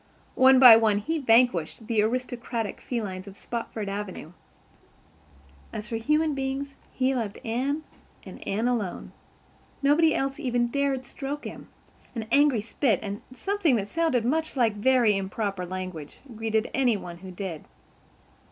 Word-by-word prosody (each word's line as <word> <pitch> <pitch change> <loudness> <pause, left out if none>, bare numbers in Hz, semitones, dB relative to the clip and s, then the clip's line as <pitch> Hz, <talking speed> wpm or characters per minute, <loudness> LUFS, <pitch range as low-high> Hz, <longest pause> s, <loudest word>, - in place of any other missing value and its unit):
One 260 0 +6
by 250 -4 +10
one 220 -2 +3
he 320 +10 -2
vanquished 225 - +2
the 225 -2 +1
aristocratic 235 -1 -2
felines 200 -6 -4
of 200 0 -11
Spofford 230 -3 -5
Avenue. 195 -5 -5 1.4
As 210 - -6
for 225 - -2
human 300 +6 +1
beings, 270 +1 -3 0.2
he 260 +1 +1
loved 225 -5 -3
Anne 265 +7 -1 0.4
and - - -10
Anne 220 +5 0
alone. 225 -7 -2 0.7
Nobody 310 +3 +4
else 270 +1 -2
even 245 -4 0
dared 275 -1 -1
stroke 275 +4 -6
him. - - -8 0.5
An 225 -2 -3
angry 285 -5 +4
spit 225 -1 0
and 205 0 -5
something 370 0 +1
that 205 -3 -1
sounded 315 -4 0
much 315 +5 0
like 230 -4 +3
very 230 0 +3
improper 195 -1 -3
language 185 -5 -6 0.2
greeted 220 0 -1
any 250 -5 +2
one 175 -3 -8
who 190 +1 -10
did. 180 -3 -6
235 Hz, 145 wpm, -26 LUFS, 205-270 Hz, 1.4 s, by